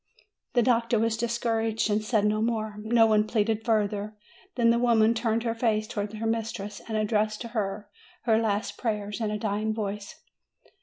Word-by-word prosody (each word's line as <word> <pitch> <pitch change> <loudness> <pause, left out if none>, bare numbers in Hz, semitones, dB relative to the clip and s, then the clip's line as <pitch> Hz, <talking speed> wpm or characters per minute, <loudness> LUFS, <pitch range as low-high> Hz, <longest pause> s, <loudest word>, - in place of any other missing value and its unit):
The 240 - +4
doctor 230 -1 +2
was 225 +1 +1
discouraged 225 -1 0
and 210 +1 +1
said 215 -1 +1
no 215 +1 +1
more. 220 -2 -1
No 225 +2 +4
one 215 -1 +3
pleaded 220 0 0
further. 210 -2 0 0.4
Then 230 -2 +4
the 235 - +2
woman 230 -2 +4
turned 225 0 0
her 230 -1 0
face 225 -2 +1
towards 210 -2 -4
her 220 +1 -4
mistress, 220 -2 -3
and 220 -1 -2
addressed 215 0 0
to 235 - -5
her 210 -3 -3 0.4
her 225 -2 +3
last 215 -1 -1
prayers 210 -2 -2
in 220 - 0
a 210 - -2
dying 215 +1 -1
voice. 205 -1 -4
220 Hz, 175 wpm, -27 LUFS, 210-230 Hz, 0.4 s, The